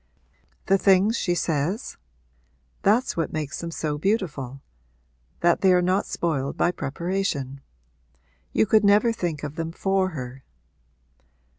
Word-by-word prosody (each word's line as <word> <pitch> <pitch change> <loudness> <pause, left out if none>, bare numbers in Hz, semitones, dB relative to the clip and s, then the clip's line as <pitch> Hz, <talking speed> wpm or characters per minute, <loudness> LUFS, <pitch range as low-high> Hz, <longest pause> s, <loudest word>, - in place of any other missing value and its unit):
'The 195 0 +3
things 195 +3 +4
she 175 -6 0
says?' 165 - -1 0.9
'That's 225 +6 +2
what 165 - -1
makes 150 -3 -4
them 170 - -4
so 150 -2 -3
beautiful 150 - -1 0.8
that 170 0 +3
they 190 - +5
are 180 - +5
not 185 +3 +1
spoiled 140 -5 -2
by 175 - +2
preparation. 150 -4 -3 0.9
You 110 - +3
could 215 -1 +4
never 210 +3 +4
think 170 -9 -3
of 150 +1 -6
them 165 0 -3
for 190 +2 0
her.' 130 -5 -7
170 Hz, 130 wpm, -24 LUFS, 150-195 Hz, 0.9 s, they